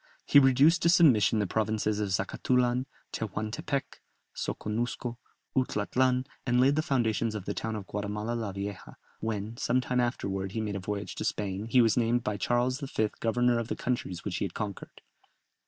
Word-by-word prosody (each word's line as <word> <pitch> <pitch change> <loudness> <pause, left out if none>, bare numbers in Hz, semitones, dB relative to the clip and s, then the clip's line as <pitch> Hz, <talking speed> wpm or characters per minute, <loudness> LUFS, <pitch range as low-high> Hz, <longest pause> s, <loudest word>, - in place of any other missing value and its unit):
He 145 - +7
reduced 140 +5 +5
to 170 - +4
submission 115 - +5
the 105 - +1
provinces 110 +1 0
of 105 -2 -1
Zacatulan, 125 +5 +1 0.3
Tehuantepec, 110 +6 -3 0.4
Soconusco, 120 +2 -3 0.4
Utlatlan, 130 +1 +1 0.2
and 125 -1 +2
laid 135 +3 +5
the 155 - +2
foundations 115 -6 0
of 100 -3 -5
the 100 - -2
town 110 +1 -3
of 105 -3 -5
Guatemala 105 +3 -3
la 115 -4 -2
Vieja; 100 -1 -6 0.2
when, 110 0 -3
some 125 +1 +1
time 125 0 -1
afterwards 95 -5 -2
he - - 0
made 105 -2 -3
a - - -2
voyage 100 +2 -4
to - - -5
Spain, 100 0 -2
he 125 +1 +5
was 115 0 +2
named 120 0 +2
by 105 - -1
Charles 120 +5 +1
V. 130 -7 -1
governor 120 +1 +2
of 115 - -3
the - - -2
countries 105 -8 -3
which 95 -3 -2
he - - -1
had 90 - -7
conquered. 105 -3 -6
115 Hz, 175 wpm, -29 LUFS, 105-125 Hz, 0.4 s, He